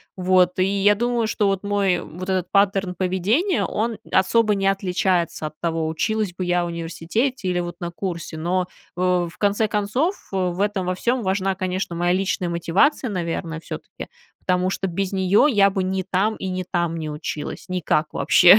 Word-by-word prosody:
Вот, 185 0 +3
и - - +5
я 200 +1 +3
думаю, 240 +2 0
что 210 -1 +1
вот 195 -1 0
мой 200 -3 +1
вот 185 +3 -8
этот 185 -2 -1
паттерн 195 -2 +2
поведения, 195 - +1
он 225 +1 -1
особо 210 +3 +3
не 195 -1 0
отличается 180 -4 0
от 155 - -12
того, 165 -2 -1
училась 210 +5 -1
бы 185 - -3
я 175 0 +2
в - - -2
университете 170 - -2
или 180 -1 +1
вот 175 -1 -4
на 175 - -3
курсе. 170 -3 -5
Но 180 +3 0 0.3
в 180 -1 +1
в - - -17
конце 205 +2 +2
концов, 215 - 0 0.2
в 185 -1 -1
этом 200 -2 0
во 180 - 0
всём 240 +6 0
важна, 190 0 0
конечно, 185 -2 -2
моя 175 +1 +1
личная 185 -1 0
мотивация, 185 - +2
наверное, 170 -3 -3
всё-таки. - - -8 0.3
Потому 180 0 +1
что 195 - -2
без 190 +2 -2
неё 190 +7 +4
я 205 -8 +5
бы 190 0 -1
не 190 0 -1
там 195 +4 0
и 190 - -5
не 185 0 -2
там 175 -2 -1
не 155 -1 -4
училась, 150 0 -5
никак 180 -4 0
вообще. 180 +3 +7
185 Hz, 185 wpm, -22 LUFS, 175-200 Hz, 0.3 s, вообще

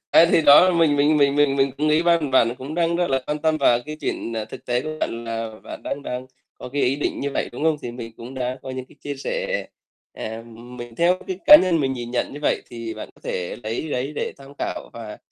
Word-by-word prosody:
À, 165 - +7
thì 165 - +4
đó 145 -1 +9
là 185 - +3
mình 160 -4 +3
mình 150 +2 +4
mình 140 -1 +4
mình 145 -2 +3
mình 135 -1 +2
cũng 155 +1 +1
nghĩ 155 +2 +4
ban 170 -4 +2
bạn 120 -2 +4
cũng 135 +4 -6
đang 170 0 +1
rất 175 0 +1
là 135 0 +2
quan 150 0 -1
tâm 155 0 +1
vào 120 -5 +4
cái 155 - -6
chuyện, 115 - -3
à, 110 - -2
thực - - -11
tế 125 +1 0
của 155 0 -5
bạn 115 0 -2
là 115 -1 -3
bạn - - -8
đang 140 - -4
đang 125 -1 -5 0.3
có - - -7
cái 145 - 0
ý 130 +2 +2
định 145 - -2
như 140 - -2
vậy, - - -2
đúng 145 - -4
không? 160 -1 +3
Thì 120 - -4
mình 115 -2 -8
cũng 125 +3 -9
đã 125 0 -3
có 130 - -6
những 130 0 -5
cái - - -20
chia 145 - -4
sẻ, - - -2 0.5
à, 110 +1 -6 0.3
mình 120 -1 -8
theo 175 +2 +3
cái 185 -1 -4
cá 300 - +12
nhân 180 - +2
mình 135 -2 0
nhìn 120 -2 -5
nhận 125 - -1
như 145 - -8
vậy, - - +1
thì 115 -2 -6
bạn 110 - -7
có - - -24
thể 90 -1 -3
lấy 115 +8 -3
đấy 135 +2 -2
để - - -3
tham 140 0 -13
khảo - - -4
và 110 -2 -8
140 Hz, 270 wpm, -23 LUFS, 120-155 Hz, 0.5 s, cá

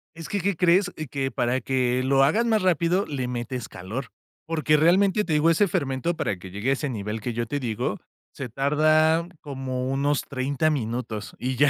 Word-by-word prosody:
Es 165 -1 -8
que, 205 - -1
¿qué 200 +1 0
crees? 180 +2 +3 0.2
Que 135 -1 -1
para 125 0 0
que 125 0 +1
lo 135 +1 +4
hagas 185 +13 +3
más 220 -2 +2
rápido 180 +1 +2
le 130 -4 -3
metes 125 -1 -4
calor, 105 +9 -6 0.4
porque, 155 -2 +2
realmente 190 +6 +4
te 160 - -1
digo, 150 +2 +4
ese 185 +5 +4
fermento 140 +1 -1
para 105 - -2
que 90 +1 -11
llegue 105 +7 -2
a - - +4
ese 140 +1 -2
nivel 105 -2 -4
que 120 +2 -4
yo 120 +1 -2
te 145 +6 -3
digo, 120 -2 -2 0.3
se 135 - -6
tarda 155 +5 +3
como 130 -2 -4
unos 140 +1 +1
30 140 +3 -1
minutos, 115 -5 -3
y 130 +1 -2
ya 145 +3 +5
135 Hz, 195 wpm, -25 LUFS, 125-160 Hz, 0.4 s, ya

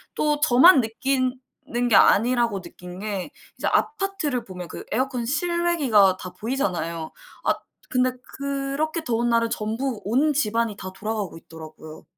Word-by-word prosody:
또 300 -1 +1
저만 280 +3 +7
느끼는 250 0 -2
게 220 - +4
아니라고 235 -2 +4
느낀 180 0 -11
게 200 -3 -4 0.3
이제 - - -2
아파트를 390 - 0
보면 180 -4 -8
그 - - -8
에어컨 255 0 -1
실외기가 295 - +2
다 185 - -8
보이잖아요. 170 - -2 0.4
아, - - +4 0.4
근데 255 0 +2 0.3
그렇게 280 +4 -2
더운 240 0 0
날은 230 -1 +2
전부 225 +2 -3
온 270 +9 +2
집안이 230 -5 0
다 190 -1 -7
돌아가고 210 -2 -4
있더라고요. 155 -1 -12
235 Hz, 305 characters per minute, -24 LUFS, 200-275 Hz, 0.4 s, 저만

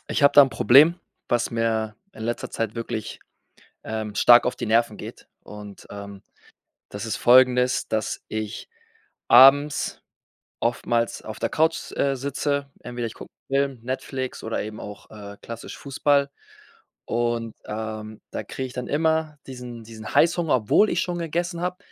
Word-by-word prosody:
ich - - -1
habe 140 - +6
da - - +9
'n 135 - +2
Problem, 140 +8 +6 0.3
was 120 -1 0
mir 110 -2 -1 0.2
in 110 - -10
letzter 120 +1 -3
Zeit 115 0 -3
wirklich, 115 -2 -5 0.7
ähm, 110 -1 -4
stark 120 +3 +7
auf 125 - 0
die - - -5
Nerven 115 -1 +2
geht - - -10
und, 105 -1 -11
ähm, 100 -1 -9 0.7
das 100 +2 -7
ist 110 - -3
folgendes: 125 0 +4
Dass 110 -1 -2
ich 110 - -5 0.6
abends 140 +3 +6 0.6
oftmals 115 0 -1
auf 110 - -8
der - - -2
Couch, 160 +1 0
äh, 140 -1 0
sitze. 140 +1 -2
Entweder 120 -1 -5
ich 110 - -6
gucke - - -12 0.2
'n - - -2
Film, 140 -2 +1
Netflix 130 +1 -4
oder 110 - -2
eben 105 0 -7
auch, 105 0 -10
äh, 100 -1 -10
klassisch 115 0 -8
Fußball 140 0 +1 0.8
und, 115 -1 -1
ähm, 110 0 -6
da - - -4
kriege 130 - -5
ich - - -12
dann 125 - -5
immer 160 0 0
diesen 125 -3 -9
diesen 110 -1 -9
Heißhunger, 170 -2 +3
obwohl 125 - +3
ich 170 - +1
schon 175 -1 -3
gegessen 170 +1 -2
habe, 180 +1 -3
120 Hz, 160 wpm, -24 LUFS, 110-140 Hz, 0.8 s, da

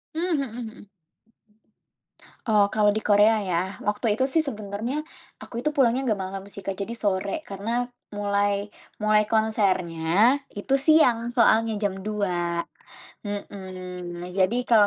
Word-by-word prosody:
Mmm, 330 - -1 0.2
mhm 275 - -1
mhm. 240 +1 -7
Mmm. - - -14 1.7
Oh, 210 -2 +5
kalau 210 -1 +3
di 215 +1 0
Korea 210 +1 +4
ya, 175 -2 0 0.2
waktu 210 +1 +1
itu 260 - +2
sih 275 +5 +2
sebenarnya, 230 +1 -3 0.3
aku 235 - -7
itu 270 - 0
pulangnya 255 -2 +3
enggak 210 -3 0
malam 190 +1 -6
sih, 200 -1 -10
Kak. 195 - -1
Jadi 230 +4 -4
sore, 200 +6 -1
karena 225 +5 -2 0.3
mulai-mulai 205 +1 0
konsernya 200 +1 +2 0.2
itu 235 +7 -1
siang, 255 -6 +4
soalnya 225 -2 +3
jam 205 -2 0
2.00, 180 -5 -1 0.6
mhm, 185 -3 -6
nah 180 - -6
jadi 195 +6 +2
kalau 225 -4 +5
210 Hz, 135 wpm, -25 LUFS, 195-230 Hz, 1.7 s, Oh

